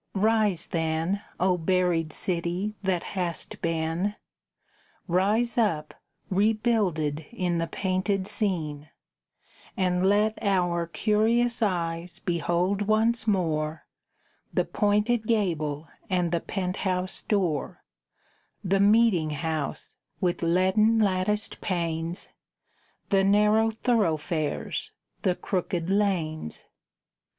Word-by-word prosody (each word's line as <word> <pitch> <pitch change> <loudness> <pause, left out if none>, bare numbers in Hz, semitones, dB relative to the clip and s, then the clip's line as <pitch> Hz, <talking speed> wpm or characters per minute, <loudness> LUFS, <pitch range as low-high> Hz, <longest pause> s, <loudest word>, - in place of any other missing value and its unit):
Rise, 210 -3 +2
then, 165 +4 -1 0.2
O 180 -1 +2
buried 175 -2 +1
city 175 +5 -2
that 190 -3 0
hast 180 -4 -4
been; 165 +4 -1 0.9
Rise 210 +7 +2
up, 160 -9 0 0.4
rebuilded 195 -8 +1
in 180 -7 -1
the 165 - -1
painted 190 +2 -1
scene, 165 -8 -2 0.9
And 180 -1 +1
let 210 +3 +3
our 175 -5 +1
curious 225 +6 +1
eyes 170 -3 -1
behold 175 +2 0
once 220 +1 +2
more 160 -6 0 0.7
The - - +1
pointed 215 +2 +1
gable 160 -9 0 0.2
and 180 -3 +1
the 170 -1 0
pent 185 -1 -3
house 185 -1 -2
door, 180 -9 -1 0.8
The 195 +1 +2
meeting 205 -5 +4
house 155 -1 -3 0.3
with 180 -3 0
leaden 190 +6 +3
latticed 210 0 0
panes, 170 -1 -2 0.8
The 195 -1 +4
narrow 210 +3 +4
thoroughfares, 170 - -1 0.3
the 180 -2 +1
crooked 180 -2 -2
lanes! 170 - -1
185 Hz, 95 wpm, -27 LUFS, 165-210 Hz, 0.9 s, meeting